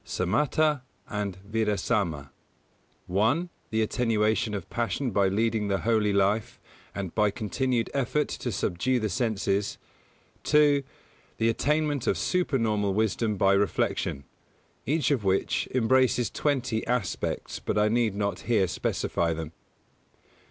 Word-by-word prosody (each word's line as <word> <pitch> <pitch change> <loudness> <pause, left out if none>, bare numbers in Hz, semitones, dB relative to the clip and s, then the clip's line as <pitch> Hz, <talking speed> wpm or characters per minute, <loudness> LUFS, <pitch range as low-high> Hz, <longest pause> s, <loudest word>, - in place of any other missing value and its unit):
Samatha 150 - +1 0.3
and 100 -3 -3
Vidarsama: 100 -9 -1 0.7
(1) 120 - +1 0.2
the 110 -1 +1
attenuation 110 -1 +1
of 100 - -5
passion 120 +2 -2
by 100 -1 +3
leading 110 +2 0
the 100 -1 0
holy 110 -2 +2
life 100 +2 +1 0.4
and 95 -3 -4
by 105 -1 +3
continued 120 +3 -1
effort 140 +2 0
to 120 - -4
subdue 100 +6 0
the 110 -2 -1
senses; 100 -4 -1 0.6
(2) 150 -1 +4 0.6
the 115 - +2
attainment 145 +2 0
of - - +2
supernormal 110 - 0
wisdom 110 0 0
by 95 +1 +4
reflection: 100 -7 0 0.6
each 150 0 +1
of 130 -7 +1
which 95 0 +1
embraces 125 -1 +2
twenty 125 -6 -1
aspects, 120 -6 -2
but - - -2
I 105 0 +4
need 115 -2 +1
not 100 -2 -1
here 105 -5 +3
specify 85 -1 -1
them. 80 -1 -5
110 Hz, 125 wpm, -27 LUFS, 100-125 Hz, 0.7 s, 2